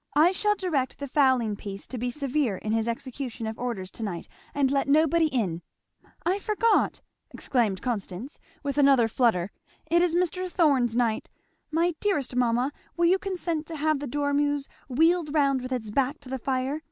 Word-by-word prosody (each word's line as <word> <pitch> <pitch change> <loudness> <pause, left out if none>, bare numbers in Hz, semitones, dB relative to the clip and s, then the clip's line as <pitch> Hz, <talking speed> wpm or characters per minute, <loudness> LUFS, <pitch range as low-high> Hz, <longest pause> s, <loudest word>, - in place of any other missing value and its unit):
I 315 +4 +6
shall 415 +2 +1
direct 315 -10 -1
the 280 - -5
fowling 260 -6 +3
piece 200 -1 -7
to 255 - -6
be 245 +2 -1
severe 270 -5 -1
in 215 - -4
his 225 0 +1
execution 240 0 -4
of 220 0 -5
orders 205 -7 -4
to - - -11
night 190 -6 -4 0.2
and 275 -2 +1
let 275 -1 +1
nobody 315 +3 +4
in. 200 - -1 0.6
I 375 +3 +1
forgot!" 430 +2 +1 0.3
exclaimed 220 -7 -1
Constance 230 - -4 0.2
with 285 0 -1
another 275 -5 +5
flutter, 220 -6 +1 0.4
"it 345 +1 +5
is 350 -1 +2
Mr. 365 +1 0
Thorn's 275 -10 +2
night! 235 -3 0 0.4
My 335 +3 +1
dearest 295 -12 -1
mamma, 245 +2 +2 0.3
will 340 - +3
you 370 +3 +4
consent 345 -5 -3
to 330 - -6
have 310 -1 +1
the 285 - -4
dormeuse 285 +1 0 0.2
wheeled 320 +3 +2
round 275 -3 +3
with 255 +1 -6
its 225 -5 -3
back 275 +5 0
to 265 - -11
the 265 0 -3
fire? 265 +4 -1
275 Hz, 175 wpm, -27 LUFS, 235-315 Hz, 0.6 s, I